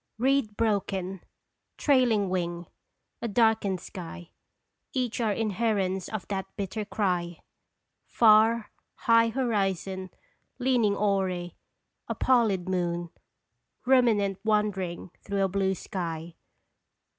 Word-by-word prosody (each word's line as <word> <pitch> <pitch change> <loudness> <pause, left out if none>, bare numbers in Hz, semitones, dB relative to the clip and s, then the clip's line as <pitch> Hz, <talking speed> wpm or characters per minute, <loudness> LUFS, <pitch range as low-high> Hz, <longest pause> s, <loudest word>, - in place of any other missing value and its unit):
Reed 250 -3 +1
broken; 195 -4 -1 0.6
trailing 245 -8 +3
wing: 175 -1 -2 0.6
a - - -2
darkened 220 -4 +2
sky; 175 -2 -9 0.6
Each 250 -3 -1
are 220 -2 +1
inherence 205 -3 -1
of 215 -3 -5
that 195 -1 -2
bitter 210 +1 -3
cry! 180 -5 -1 0.7
Far, 220 0 +4 0.2
high 230 0 +4
horizon, 195 -6 -1 0.5
leaning 245 -5 +2
awry, 190 -4 0 0.5
A - - -3
pallid 220 -8 +2
moon 175 -2 -1 0.7
Ruminant 225 -7 +3
wandering 200 -5 -1
through 200 -1 -1
a - - +3
blue 190 0 0
sky. 170 -2 -5
200 Hz, 100 wpm, -27 LUFS, 185-225 Hz, 0.7 s, Far